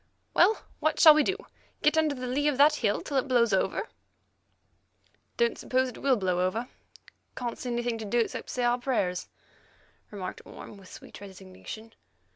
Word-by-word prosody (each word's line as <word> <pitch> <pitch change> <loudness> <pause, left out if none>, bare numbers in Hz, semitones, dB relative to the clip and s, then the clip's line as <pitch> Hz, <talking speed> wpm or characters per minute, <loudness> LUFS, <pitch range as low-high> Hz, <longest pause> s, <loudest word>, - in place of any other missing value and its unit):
"Well, 440 - +4 0.2
what 310 0 0
shall 310 - +10
we 305 - +4
do? 380 +6 0 0.5
Get 300 - +4
under 310 -2 +2
the 255 -1 -6
lee 275 +4 0
of 290 -3 +1
the 290 +2 +7
hill 210 -8 0
until 280 - -3
it 265 - 0
blows 235 -4 +3
over?" 190 - 0 1.5
"Don't 470 -1 +1
suppose 260 0 0
it - - -11
will 275 -2 +3
blow 185 -4 -1
over. 220 +7 -1 0.7
Can't 240 -1 -4
see 250 - -5
anything 240 -1 -2
to 220 - -5
do 210 +4 -1
except 230 - -2
say 250 - -2
our 240 +1 +2
prayers," 195 -9 -1 0.8
remarked 195 -3 -7
Orme - - -11
with 190 -2 -15
sweet - - -12
resignation. 195 +3 -10
245 Hz, 175 wpm, -28 LUFS, 205-280 Hz, 1.5 s, shall